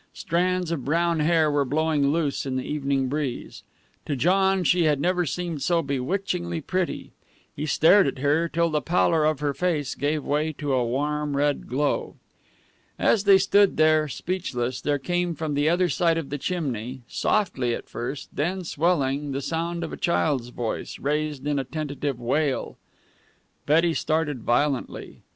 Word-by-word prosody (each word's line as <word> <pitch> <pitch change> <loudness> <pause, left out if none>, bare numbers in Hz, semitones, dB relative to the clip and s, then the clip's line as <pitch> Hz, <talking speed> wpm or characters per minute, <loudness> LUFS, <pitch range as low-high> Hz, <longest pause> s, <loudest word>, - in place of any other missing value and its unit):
Strands 180 0 0
of 155 -6 -2
brown 170 +2 +1
hair 155 0 +3
were 145 -1 +2
blowing 150 +1 +1
loose 145 -2 0
in 130 - -2
the 130 - -1
evening 140 -2 -1
breeze. 140 -2 -4 0.5
To 145 - -1
John 190 +6 +2
she 175 -1 +3
had 150 -3 +2
never 180 +2 +1
seemed 170 -2 -3
so 170 +1 +1
bewitchingly 175 +5 -2
pretty. 185 +3 -3 0.4
He 150 +2 -4
stared 165 +5 +5
at 135 - -3
her 150 +5 +1
till 170 +2 +1
the 150 -1 0
pallor 165 0 +2
of 155 -2 0
her 145 -1 0
face 155 -4 -1
gave 145 +2 -1
way 155 +2 0
to 145 -1 -3
a 125 -1 +2
warm 145 +4 -1
red 145 0 0
glow. 140 +3 -1 0.8
As 210 -3 +2
they 200 -1 +8
stood 195 +1 +3
there, 155 0 +4
speechless, 130 -7 -3
there 145 -1 0
came 175 +3 -1
from 155 -2 -3
the 145 +2 +2
other 180 +2 +2
side 165 -1 +1
of 155 -5 -4
the 145 - -3
chimney, 130 -7 -3
softly 130 - 0
at - - -9
first, 125 +4 -5
then 180 +6 -1
swelling, 145 -4 0
the 135 - -2
sound 170 +3 -2
of 165 - -5
a - - -5
child's 145 -7 0
voice, 120 -2 -4
raised 150 -1 -2
in 145 -1 0
a - - -1
tentative 140 -2 -4
wail. 135 +3 -1 0.9
Betty 165 +3 +4
started 155 -5 -1
violently. 135 +3 -1
150 Hz, 165 wpm, -25 LUFS, 140-170 Hz, 0.9 s, they